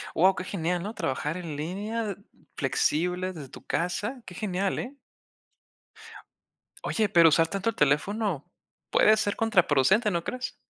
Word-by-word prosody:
Guau, 185 +4 +5
qué - - -4
genial, 175 -2 -2
¿no? 210 +3 -5
Trabajar 150 -1 -2
en 165 -4 -6
línea 200 +9 -3
de 200 -3 -4 0.4
flexibles, 180 - 0
desde 140 -4 -8
tu - - -13
casa. 205 - -2
Qué 180 - -10
genial, 195 -1 -1
¿eh? 265 +4 -6 1.9
Oye, 215 -2 0
pero 170 -4 +7
usar 165 +2 +3
tanto 195 +5 -1
el 225 - -4
teléfono 155 +4 +1 0.5
puede 215 0 +5
ser 205 -2 0
contraproducente, 200 - +3
¿no 170 -2 -1
crees? 255 +6 -5
185 Hz, 145 wpm, -27 LUFS, 165-215 Hz, 1.9 s, pero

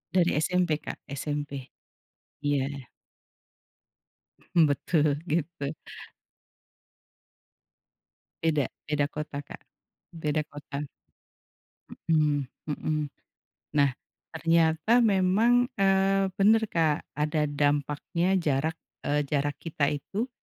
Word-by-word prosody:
Dari 175 -2 +4
SMP 175 -2 +1
Kak. - - -8
SMP. 145 -1 -4 0.7
Iya. 140 -2 -1 1.7
Betul, 150 -1 +3
gitu. 155 -2 -2 2.7
Beda. 155 -4 +2 0.2
Beda 145 -1 +1
kota 150 -1 -5
Kak. - - -11 0.5
Beda 155 -1 -1
kota. 145 0 -6 1.0
Hmm 150 -3 +1 0.2
hmm. 155 +1 -1 0.8
Nah, 140 -1 +5 0.4
ternyata 165 +7 +3
memang, 220 +4 +4
eee, 195 -2 +3
benar 220 +3 +5
Kak, 160 -3 +2 0.2
ada 150 0 +1
dampaknya 145 +5 +1
jarak, 160 -1 0 0.2
eee, 145 0 0
jarak 145 0 -1
kita 150 -3 0
itu 195 - -3
155 Hz, 80 wpm, -28 LUFS, 145-175 Hz, 2.7 s, Nah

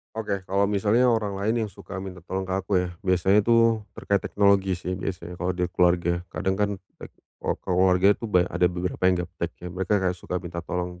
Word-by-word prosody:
Oke. 100 -4 -3
Kalau 100 +2 +1
misalnya 105 +5 +3
orang 105 -4 0
lain 110 +2 +1
yang 105 - -6
suka 100 - -9
minta 95 -1 -7
tolong 95 +3 -4
ke 95 - -5
aku 95 +1 -2
ya, - - -4
biasanya 95 +2 +3
itu 115 0 +4 0.2
terkait 100 -2 0
teknologi 100 -2 +2
sih. 90 +1 -4
Biasanya 90 -1 -5
kalau 90 +1 0
dari 90 0 -1
keluarga, 85 -1 +2
kadang 95 -1 -1
kan, 105 +1 0 0.3
eee, - - -8 0.3
kalau - - -1 0.2
keluarga 95 +2 +5
itu 115 +2 -6
banyak 90 -3 +4
ada 90 0 +3
beberapa 90 0 -4
yang 90 - +3
gaptek 85 -1 -5
ya, 90 - -8
mereka 95 +3 0
kayak 95 -2 +1
suka 90 0 -5
minta 85 -1 -5
tolong. 90 +1 -4
95 Hz, 205 wpm, -25 LUFS, 90-100 Hz, 0.3 s, keluarga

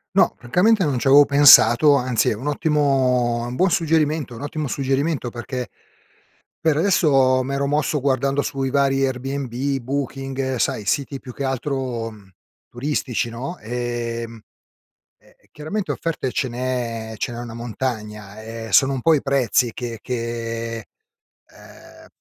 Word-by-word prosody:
No, - - +4
francamente, 180 - +2
non 140 -3 0
ci 125 - -2
avevo 140 +2 +8
pensato, 140 -1 +7
anzi, 125 -3 +1
è - - -1
un 130 +7 -7
ottimo 135 -5 +1
è - - -4
un 125 - -5
buon 185 +5 +3
suggerimento, 155 -4 +1
è 115 - -9
un 140 - -8
ottimo 150 -1 -4
suggerimento 135 0 -1
perché, 125 +1 -5 0.9
per 160 -2 +2
adesso, 140 -7 +3
m'ero 140 +1 -2
mosso 150 0 0
guardando 140 +1 +1
su 135 -1 -4
i 135 - 0
vari 135 0 +2
Airbnb, 135 +1 -3
Booking, 135 0 -3
sai, 110 - -1
siti 140 +4 -1
più 125 - -9
che 140 - -5
altro, 130 -3 -3
mhmm, 100 -3 -17 0.4
turistici, 125 -2 -2
no, 130 +9 -6
ehm, 115 -1 -4 0.8
e - - -25
e - - -30
chiaramente 185 +7 -4
offerte 155 -6 -2
ce 130 - -1
n'è 120 -2 -3
ce 120 - -3
n'è 120 - -7
una 120 -1 -7
montagna, 110 -4 -5
ehm, 115 0 -8
sono 135 0 +5
un 130 - -2
po' 160 +6 +4
i 145 - 0
prezzi 130 -3 +1
che 115 -2 -6
che, 115 -1 -4 0.7
ehm, - - -16
130 Hz, 155 wpm, -21 LUFS, 120-140 Hz, 0.9 s, avevo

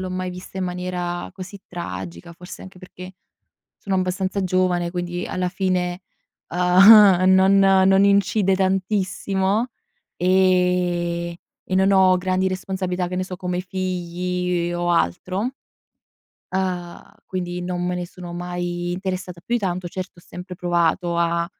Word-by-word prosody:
l'ho 185 0 -4
mai 185 0 -3
vista 180 +1 -9
in 190 - -1
maniera 180 -1 -4
così 195 +2 -9
tragica, 90 - -7
forse 180 +2 -11
anche 190 -1 -12
perché 185 0 -11 0.6
sono 195 -1 -2
abbastanza 185 +1 -1
giovane 180 -1 +1
quindi 175 0 -4
alla 180 -1 -2
fine, 180 -1 -1 0.5
uhm, 185 +2 +7
non 190 +1 +5
non 195 0 +5
incide 200 0 +3
tantissimo, 195 +2 0 0.5
ehm, 180 -2 +1 0.3
e 185 - -2
non 190 +1 +4
ho 190 -1 +5
grandi 185 +1 0
responsabilità, 185 -1 -3
che 180 - -3
ne 185 - 0
so, 185 - -6
come 180 -1 -3
i - - -1
figli 180 -1 -2
e 175 - -3
o 175 0 -1
altro 185 - 0 1.0
uhm, 180 -2 -3 0.2
quindi 180 -1 -4
non 180 0 -3
me 180 0 -1
ne 175 0 -4
sono 175 0 -10
mai 175 0 -4
interessata 185 -1 -4
più 240 - -1
di - - -3
tanto, 180 -2 -2
certo 185 0 -7
ho - - -16
sempre 180 +1 -9
provato 175 0 0
a, 170 0 +1
180 Hz, 145 wpm, -22 LUFS, 175-190 Hz, 1.0 s, uhm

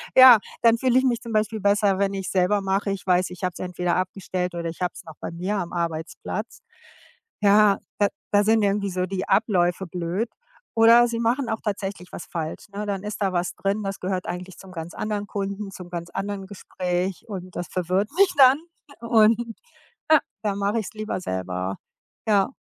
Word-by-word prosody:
ja, 255 -4 +10 0.2
dann 230 -1 +5
fühle 255 +1 +2
ich - - 0
mich 240 -3 +2
zum 230 -2 -7
Beispiel 215 0 0
besser, 200 -1 +3
wenn 200 0 +1
ich's 195 -1 -4
selber 190 +2 +2
mache. 195 +1 0
Ich 195 -2 -5
weiß, 180 0 +3
ich 180 +1 -10
habe 180 - +1
es - - -11
entweder 180 -1 -1
abgestellt 185 -1 -2
oder 170 -1 -3
ich 165 +2 -10
habe 180 - 0
es - - -10
noch 160 -2 -11
bei - - -5
mir 185 +5 -2
am 175 -2 -4
Arbeitsplatz. 165 -1 -4 0.8
Ja, 205 0 +5 0.2
da 205 - +5 0.2
da 205 0 +4
sind 220 0 +4
irgendwie 200 0 +1
so 185 0 -1
die 190 0 -4
Abläufe 190 -3 +2
blöd, 180 +7 -2 0.5
oder 230 +1 +7
sie 230 - -2
machen 235 +2 0
auch 220 - -1
tatsächlich 195 -3 -4
was - - -7
falsch, 160 +2 -5
ne? 210 +1 -4
Dann 200 -2 -3
ist 210 0 -5
da 190 -2 +1
was 175 0 -1
drin, 200 +2 -1
das 195 0 -4
gehört 185 0 -3
eigentlich 180 +1 -6
zum 190 -1 -12
ganz 165 0 -6
anderen 210 -1 -3
Kunden, 200 0 -4
zum 180 -2 -10
ganz 170 -1 -5
anderen 195 0 -4
Gespräch 185 -2 -3
und 185 -3 -7
das 175 - -3
verwirrt 185 +3 0
mich 395 -1 +5
dann. 270 +1 +7 0.4
Und, 230 0 +3 0.6
ja, 310 -2 +7 0.2
da 205 -2 0
mache 200 +3 0
ich's 210 - -8
lieber 215 -3 -3
selber. 95 - -3 0.5
Ja. 200 -2 +4
195 Hz, 195 wpm, -24 LUFS, 180-215 Hz, 0.8 s, ja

